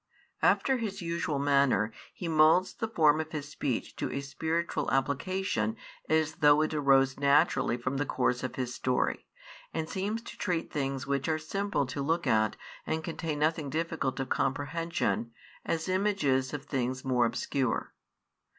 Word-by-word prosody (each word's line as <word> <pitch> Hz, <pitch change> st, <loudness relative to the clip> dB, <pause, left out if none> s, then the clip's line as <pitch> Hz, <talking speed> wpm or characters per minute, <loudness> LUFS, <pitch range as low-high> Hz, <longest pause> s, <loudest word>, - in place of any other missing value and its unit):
After 265 Hz, -1 st, +3 dB
His 205 Hz, -6 st, -4 dB
usual 170 Hz, -3 st, -1 dB
manner, 140 Hz, -5 st, +3 dB, 0.2 s
He 175 Hz, -, -6 dB
moulds 160 Hz, +3 st, +4 dB
the 225 Hz, -, -3 dB
form 160 Hz, -8 st, +4 dB
of 160 Hz, 0 st, -7 dB
His 145 Hz, -2 st, -4 dB
speech 140 Hz, -4 st, -3 dB
to -, -, -2 dB
a 140 Hz, -, -2 dB
spiritual 160 Hz, +5 st, -2 dB
application 185 Hz, -, 0 dB, 0.3 s
as 155 Hz, 0 st, +1 dB
though 150 Hz, 0 st, +6 dB
it 155 Hz, 0 st, 0 dB
arose 135 Hz, -3 st, +4 dB
|70 -, -, -16 dB
naturally 140 Hz, -3 st, +3 dB
from 130 Hz, +3 st, -2 dB
the 145 Hz, -, 0 dB
course 125 Hz, -1 st, +1 dB
of 130 Hz, 0 st, -4 dB
His 125 Hz, -1 st, -3 dB
story, 125 Hz, -1 st, -1 dB, 0.5 s
and 160 Hz, -1 st, -1 dB
seems 205 Hz, +6 st, -3 dB
to -, -, -10 dB
treat 175 Hz, -4 st, -2 dB
things 135 Hz, -2 st, -2 dB
which 140 Hz, 0 st, -1 dB
are 155 Hz, -, +2 dB
simple 195 Hz, 0 st, -1 dB
to 130 Hz, +2 st, -4 dB
look 165 Hz, +4 st, 0 dB
at 110 Hz, -1 st, +2 dB, 0.3 s
and 160 Hz, 0 st, -1 dB
contain 160 Hz, -2 st, -3 dB
nothing 155 Hz, -1 st, 0 dB
difficult 155 Hz, -3 st, -2 dB
of 135 Hz, -, -3 dB
comprehension, 140 Hz, -3 st, -1 dB, 0.3 s
as 160 Hz, +1 st, -2 dB
images 185 Hz, -9 st, +1 dB
of 145 Hz, -1 st, -5 dB
things 130 Hz, -1 st, -2 dB
more 125 Hz, -2 st, +3 dB
obscure. 130 Hz, +1 st, -1 dB
145 Hz, 160 wpm, -30 LUFS, 135-165 Hz, 0.5 s, though